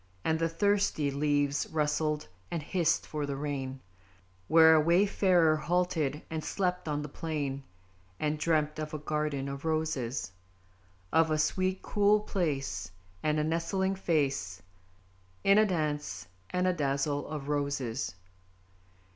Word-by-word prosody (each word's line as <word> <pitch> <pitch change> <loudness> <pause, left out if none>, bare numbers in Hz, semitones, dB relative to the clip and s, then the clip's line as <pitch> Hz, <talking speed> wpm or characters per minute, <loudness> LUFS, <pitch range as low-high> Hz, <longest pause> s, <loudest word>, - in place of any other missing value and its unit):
And 160 0 +1
the 165 0 +1
thirsty 195 -5 +1
leaves 145 0 +1
rustled, 150 0 0 0.2
and 165 -3 -3
hissed 170 0 +1
for 150 -2 -3
the 140 - -2
rain, 135 -2 -4 0.7
Where 160 0 +7
a 155 - +6
wayfarer 175 -1 +4
halted 160 -2 0
and 160 -1 -4
slept 180 -2 -1
on 150 -1 -1
the - - -5
plain; 145 -3 -3 0.6
And 150 0 -1
dreamt 155 -1 +1
of 155 0 -4
a - - -1
garden 150 -2 -2
of 140 0 -6
Roses! 140 - -1 0.8
Of 165 0 +5
a - - +1 0.5
cool 205 0 +3
sweet 210 - -8
place, 135 - -1 0.3
And 155 0 +1
a - - +1
nestling 170 +4 0
face 140 - -1 0.8
In 195 +2 +6
a 215 - +5
dance 150 - -2 0.2
and 180 0 0
a 185 - +3
dazzle 145 -1 -1
of 150 -3 -5
Roses. 140 -7 -2
155 Hz, 135 wpm, -30 LUFS, 140-165 Hz, 0.8 s, Where